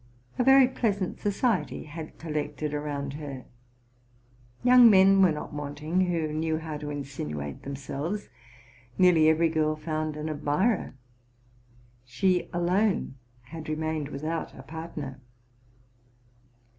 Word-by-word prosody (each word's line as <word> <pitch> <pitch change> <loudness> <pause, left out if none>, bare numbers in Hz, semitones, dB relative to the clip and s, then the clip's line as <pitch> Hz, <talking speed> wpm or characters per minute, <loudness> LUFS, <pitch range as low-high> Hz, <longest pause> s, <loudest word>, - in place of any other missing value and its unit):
A - - +4
very 265 0 +7
pleasant 205 -7 -1
society 205 +1 0
had 155 +1 -9
collected 150 -1 -3
around 145 -2 -3
her: 140 -3 -7 1.2
young 250 -1 +8
men 195 -1 +6
were 185 -3 +6
not 150 0 -5
wanting 150 +5 -1
who 165 -3 -1
knew 160 0 0
how 160 -1 -5
to 145 0 -6
insinuate 75 - -5
themselves; 140 +8 -4 0.7
nearly 170 -4 +5
every 160 +1 +3
girl 155 -1 +1
found 155 0 -3
an 150 +1 -4
admirer; 155 - 0 1.1
she 180 +8 0
alone 180 +1 +1 0.3
had 155 +6 -9
remained 155 -1 -2
without 155 +4 -4
a 130 - -10
partner. 150 -3 -7
155 Hz, 115 wpm, -27 LUFS, 145-180 Hz, 1.2 s, young